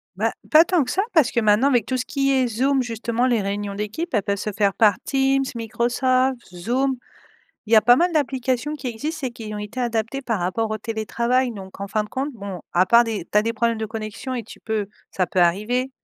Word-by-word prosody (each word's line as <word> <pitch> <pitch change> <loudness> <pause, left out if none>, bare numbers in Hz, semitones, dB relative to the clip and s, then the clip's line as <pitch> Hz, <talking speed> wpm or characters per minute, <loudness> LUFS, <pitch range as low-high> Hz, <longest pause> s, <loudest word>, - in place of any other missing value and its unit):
Bah, - - 0 0.2
pas 315 +1 +8
tant 345 -5 +2
que 250 - -6
ça 390 - +1
parce 305 -8 +4
que 235 - +1
maintenant 215 +4 +4
avec 245 -6 +2
tout 260 0 -1
ce 250 - -2
qui 275 -1 0
est 260 -2 +2
Zoom 260 +4 +1
justement 235 +1 -1
les 235 -4 +2
réunions 200 0 -3
d'équipe, 210 +11 -4
elles 210 -3 +2
peuvent 200 - 0
se 210 +1 -3
faire 200 -1 +1
par 210 -2 +4
Teams, 270 0 +2
Microsoft, 255 +3 +1 0.2
Zoom. 255 +9 0 0.7
Il 225 - -5
y - - +8
a 215 - +8
pas 245 +3 +6
mal 345 +2 +2
d'applications 265 -1 -1
qui 280 -4 -5
existent 290 +5 -4
et 250 - -3
qui 220 -2 -8
ont - - -4
été 210 +5 -6
adaptées 235 +2 -1
par 235 -5 -2
rapport 215 +5 -1
au 215 - -1
télétravail 235 +3 -1
donc 190 -1 -10
en 200 - -4
fin 210 +1 0
de - - -13
compte, 275 +3 -2
bon 200 -4 -7
à 180 +1 +5
part 235 +5 +5
des 215 -6 -3
tu 210 - +1
as 210 - +3
des 230 +1 -2
problèmes 230 0 0
de 220 - -2
connexion 220 +4 -5
et 240 - -3
tu 220 - -13
peux 220 -2 -2 0.2
ça 185 - 0
peut 185 - 0
arriver 215 +9 +1
235 Hz, 240 wpm, -22 LUFS, 210-260 Hz, 0.7 s, pas